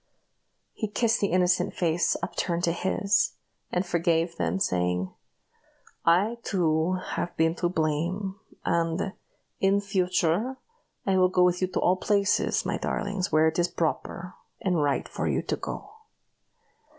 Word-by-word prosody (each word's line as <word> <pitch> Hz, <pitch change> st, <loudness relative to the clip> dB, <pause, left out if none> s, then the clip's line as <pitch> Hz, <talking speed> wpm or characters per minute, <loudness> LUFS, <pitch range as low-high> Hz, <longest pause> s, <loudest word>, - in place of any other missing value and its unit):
He 215 Hz, -, -3 dB
kissed 225 Hz, +2 st, +1 dB
the 200 Hz, -, +2 dB
innocent 180 Hz, -1 st, +2 dB
face 170 Hz, -1 st, +1 dB
upturned 175 Hz, -1 st, -1 dB
to 170 Hz, -, +3 dB
his, 190 Hz, +3 st, +1 dB, 0.4 s
and 180 Hz, +2 st, 0 dB
forgave 170 Hz, -1 st, +1 dB
them, -, -, 0 dB
saying, 90 Hz, -, 0 dB, 0.9 s
"I, 195 Hz, +8 st, +3 dB
too, 165 Hz, -3 st, +1 dB, 0.2 s
have 175 Hz, -, -3 dB
been 160 Hz, 0 st, +3 dB
to 175 Hz, -, +1 dB
blame; 175 Hz, +4 st, -1 dB, 0.3 s
and, 170 Hz, +4 st, 0 dB, 0.5 s
in 195 Hz, +1 st, +3 dB
future, 190 Hz, +4 st, 0 dB, 0.5 s
I 195 Hz, -1 st, +2 dB
will 185 Hz, 0 st, +5 dB
go 180 Hz, -1 st, +3 dB
with 180 Hz, 0 st, +2 dB
you 185 Hz, -, +2 dB
to -, -, -2 dB
all 185 Hz, +1 st, +3 dB
places, 200 Hz, +1 st, +1 dB
my -, -, -1 dB
darlings, 200 Hz, -2 st, -2 dB
where 155 Hz, +1 st, +5 dB
it 160 Hz, +2 st, 0 dB
is 175 Hz, -, +3 dB
proper, 170 Hz, +2 st, -3 dB, 0.3 s
and 180 Hz, -5 st, +1 dB
right 145 Hz, -1 st, 0 dB
for -, -, -3 dB
you -, -, 0 dB
to -, -, -1 dB
go." 405 Hz, -, -6 dB
180 Hz, 145 wpm, -27 LUFS, 165-195 Hz, 0.9 s, will